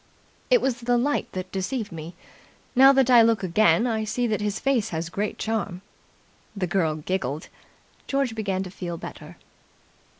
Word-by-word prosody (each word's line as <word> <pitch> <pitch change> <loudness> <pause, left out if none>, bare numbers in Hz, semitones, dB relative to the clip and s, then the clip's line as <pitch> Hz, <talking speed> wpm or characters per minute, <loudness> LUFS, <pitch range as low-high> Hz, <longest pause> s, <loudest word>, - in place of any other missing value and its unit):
"It - - +5
was 250 -3 0
the 245 0 +1
light 285 +5 0
that 185 0 -5
deceived 210 +4 -3
me. 165 +1 -8 0.6
Now 270 +2 +8
that 265 -2 +3
I 240 -2 +8
look 225 -3 +3
again, 215 +5 +3
I 220 -3 0
see 240 +3 -1
that 215 -2 -1
his 210 0 -2
face 270 -6 +1
has 165 0 -3
great 205 +4 -3
charm." 205 -4 -3 0.7
The 195 -2 -1
girl 170 -3 0
giggled. 155 -2 -3 0.6
George 275 -4 0
began 195 -4 -2
to 185 - -8
feel 175 -3 -5
better. - - -10
210 Hz, 165 wpm, -25 LUFS, 185-240 Hz, 0.7 s, Now